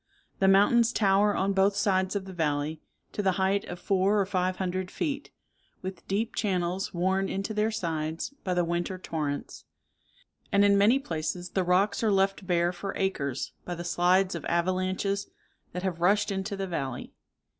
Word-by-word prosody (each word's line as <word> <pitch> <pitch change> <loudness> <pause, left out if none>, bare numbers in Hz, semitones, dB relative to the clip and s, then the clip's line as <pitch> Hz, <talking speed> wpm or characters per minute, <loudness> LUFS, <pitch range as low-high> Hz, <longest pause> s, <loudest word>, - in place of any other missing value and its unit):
The 195 - +4
mountains 225 +5 +5
tower 205 -1 +3
on 195 +1 +1
both 195 +1 +3
sides 190 -1 +1
of 195 -1 -2
the 190 - -8
valley 150 -2 -1 0.3
to - - -2
the 190 -2 +2
height 195 +2 +1
of 175 - -6
four 195 +2 +2
or 195 - +2
five 185 -1 0
hundred 185 0 -2
feet, 285 - -3 0.5
with 185 -2 -7
deep 215 +4 -1
channels 185 -2 -1
worn 190 +2 0
into 195 +3 -3
their 215 +1 +1
sides 165 - -3
by 180 -1 -1
the 175 -1 +2
winter 175 +2 -2
torrents; 150 -5 -4 0.9
and 200 0 +5
in 200 0 +5
many 205 +6 +5
places 175 - -4
the 190 - +1
rocks 185 +3 +2
are 225 - +2
left 195 -1 +1
bare 175 -1 +2
for 195 +2 -5
acres 140 -9 -2
by 175 - -4
the 175 - -6
slides 180 +2 +2
of 170 -4 -5
avalanches 185 +3 0 0.4
that 180 - -5
have 175 -3 -2
rushed 205 +4 +3
into 195 +1 -2
the 195 - -2
valley. 135 -8 -4
190 Hz, 175 wpm, -28 LUFS, 175-200 Hz, 0.9 s, mountains